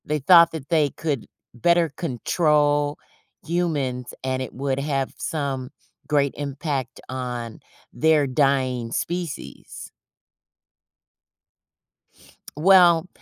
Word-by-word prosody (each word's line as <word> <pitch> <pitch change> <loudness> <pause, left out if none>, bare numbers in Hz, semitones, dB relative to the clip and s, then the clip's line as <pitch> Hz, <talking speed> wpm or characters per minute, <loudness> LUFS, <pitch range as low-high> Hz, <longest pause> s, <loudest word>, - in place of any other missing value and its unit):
They 150 0 -1
thought 170 +3 +6
that 155 -3 -8
they 155 -4 +3
could 145 -5 -4 0.3
better 170 +7 +2
control 145 0 0 0.5
humans, 145 -8 -2
and 130 0 -2
it 130 - -6
would 135 0 -2
have 140 -2 -2
some 135 -4 -3 0.4
great 140 -2 +1
impact 140 -2 -4
on 125 -3 -5 0.3
their 155 -2 +3
dying 130 -3 0
species. 170 0 -5 2.7
Well, 175 0 +5
145 Hz, 90 wpm, -23 LUFS, 130-160 Hz, 2.7 s, thought